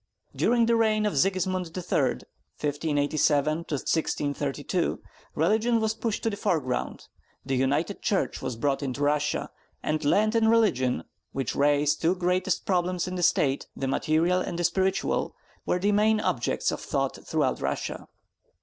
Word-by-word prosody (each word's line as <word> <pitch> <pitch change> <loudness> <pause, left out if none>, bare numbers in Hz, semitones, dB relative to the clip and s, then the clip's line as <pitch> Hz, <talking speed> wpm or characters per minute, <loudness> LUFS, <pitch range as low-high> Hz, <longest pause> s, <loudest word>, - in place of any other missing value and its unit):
During 235 -1 +3
the 230 0 +3
reign 215 -2 +2
of 210 - 0
Sigismund 185 +2 +1
III. 180 - 0 0.3
(1587 145 0 +1
1632), 145 0 -1 0.4
religion 220 +8 +2
was 220 0 0
pushed 225 -1 -3
to 225 - +1
the - - -3
foreground, 160 -11 -2 0.4
the 135 - -1
United 145 +9 0
Church 200 - -1
was 130 -2 -3
brought 140 +4 0
into 140 0 -3
Russia; 150 +1 0 0.3
and 155 0 -1
land 210 +9 +3
and 225 -1 +3
religion, 160 - +2 0.3
which 135 -3 -2
raise 145 +1 +3
the - - -18
two 170 +3 +2
greatest 180 0 0
problems 180 -1 0
in 185 - -4
a - - -1
State, 140 -5 +2
the 135 - -3
material 165 +6 +1
and 175 - -4
the 175 - -1
spiritual, 190 +3 0 0.3
were - - +2
the 200 +3 +1
main 215 +1 +3
objects - - 0
of - - -5
thought - - -2
throughout - - 0
Russia. - - -3
170 Hz, 150 wpm, -27 LUFS, 145-200 Hz, 0.4 s, During